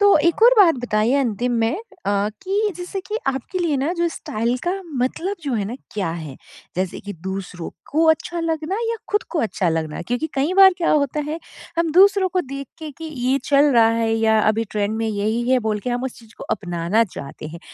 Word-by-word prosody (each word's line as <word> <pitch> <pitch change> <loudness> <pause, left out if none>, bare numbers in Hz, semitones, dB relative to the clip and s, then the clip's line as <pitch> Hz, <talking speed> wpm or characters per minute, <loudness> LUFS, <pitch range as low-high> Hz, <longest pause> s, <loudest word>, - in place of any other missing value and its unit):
तो 405 -3 +6
एक 340 +7 +1
और - - +8
बात 345 -6 +7
बताइए 215 +3 +2
अंतिम 245 -2 0
में 225 +6 +1 0.3
अ, 200 +1 +1
कि 405 +2 0
जैसे 360 +2 -5
कि 425 +3 -4
आपके 270 +7 -2
लिए 330 -5 +1
ना 280 +6 0
जो 340 0 +2
स्टाइल 235 -4 -2
का 355 - +2 0.3
मतलब 360 +10 -2
जो 280 -3 -2
है 205 -3 0
ना, 225 +5 -4 0.2
क्या 200 -5 -1
है? 155 -5 -6 0.4
जैसे 185 -1 -2
कि 205 +1 -7
दूसरों 190 -3 -5 0.2
को 320 +3 +3
अच्छा 335 +2 -1
लगना 325 +2 -1
या 460 - -1
खुद 415 - +1
को 345 - -1
अच्छा 195 -5 0
लगना? 160 -2 -2
क्योंकि 245 - -2
कई 280 +6 +1
बार 385 -1 +8
क्या 335 - +1
होता 295 0 +2
है 320 - -3 0.4
हम 335 -1 +2
दूसरों 390 +1 +5
को 365 0 0
देख 275 -1 -6
के 310 -2 -6
कि 325 - -7
ये 270 -3 0
चल 285 +1 +4
रहा 230 -2 +6
है 230 -1 +1
या 220 -1 +3
अभी 225 +1 +1
ट्रेंड 210 +1 -1
में 225 0 -1
यही 220 +4 -1
है 260 - +5
बोल 210 -1 0
के 245 - -3
हम 245 +1 -1
उस 260 - -5
चीज़ 225 -2 -17
को - - -7
अपनाना 180 +3 +1
चाहते 155 -5 -8
हैं। 170 +2 -9
255 Hz, 220 wpm, -21 LUFS, 215-330 Hz, 0.4 s, और